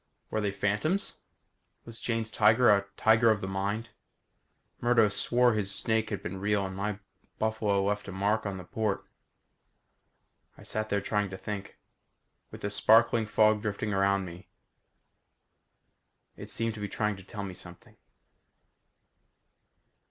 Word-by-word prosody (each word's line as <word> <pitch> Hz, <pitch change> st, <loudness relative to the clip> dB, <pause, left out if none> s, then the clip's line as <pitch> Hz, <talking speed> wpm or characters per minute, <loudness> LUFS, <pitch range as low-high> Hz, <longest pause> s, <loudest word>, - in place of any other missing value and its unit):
Were 110 Hz, -, 0 dB
they 105 Hz, -, 0 dB
phantoms? 105 Hz, -, -1 dB, 0.7 s
Was 115 Hz, 0 st, -10 dB
Jane's 115 Hz, -1 st, -2 dB
tiger 110 Hz, +3 st, +5 dB
a 100 Hz, 0 st, -2 dB
tiger 110 Hz, +1 st, +5 dB
of 110 Hz, -2 st, +3 dB
the 95 Hz, -, -4 dB
mind? 100 Hz, +4 st, -2 dB, 0.9 s
Murdo 120 Hz, -3 st, +4 dB
swore 120 Hz, +4 st, +2 dB
his 105 Hz, -3 st, -1 dB
snake 110 Hz, +1 st, 0 dB
had 100 Hz, -, -4 dB
been 95 Hz, +2 st, -5 dB
real 100 Hz, 0 st, +1 dB
and 95 Hz, 0 st, -6 dB
my 100 Hz, +1 st, -2 dB, 0.4 s
buffalo 110 Hz, -3 st, +1 dB
left 105 Hz, +1 st, -1 dB
a -, -, -5 dB
mark 100 Hz, +3 st, 0 dB
on 100 Hz, -1 st, -4 dB
the 90 Hz, -, -8 dB
port. 105 Hz, +2 st, -2 dB, 1.5 s
I -, -, -13 dB
sat 110 Hz, 0 st, -3 dB
there 100 Hz, 0 st, +1 dB
trying 105 Hz, 0 st, -1 dB
to 95 Hz, -, -7 dB
think. 100 Hz, 0 st, -6 dB, 0.7 s
With -, -, -11 dB
the 105 Hz, -, -3 dB
sparkling 115 Hz, +1 st, +4 dB
fog 110 Hz, 0 st, +3 dB
drifting 105 Hz, 0 st, -2 dB
around 100 Hz, 0 st, +2 dB
me. 90 Hz, +1 st, -11 dB, 1.9 s
It -, -, -9 dB
seemed 115 Hz, 0 st, -1 dB
to 110 Hz, -, -9 dB
be 105 Hz, -, -3 dB
trying 105 Hz, +1 st, -1 dB
to 95 Hz, -, -12 dB
tell 100 Hz, +1 st, -7 dB
me 95 Hz, -2 st, -5 dB
something. 85 Hz, 0 st, -12 dB
105 Hz, 145 wpm, -29 LUFS, 100-110 Hz, 1.9 s, tiger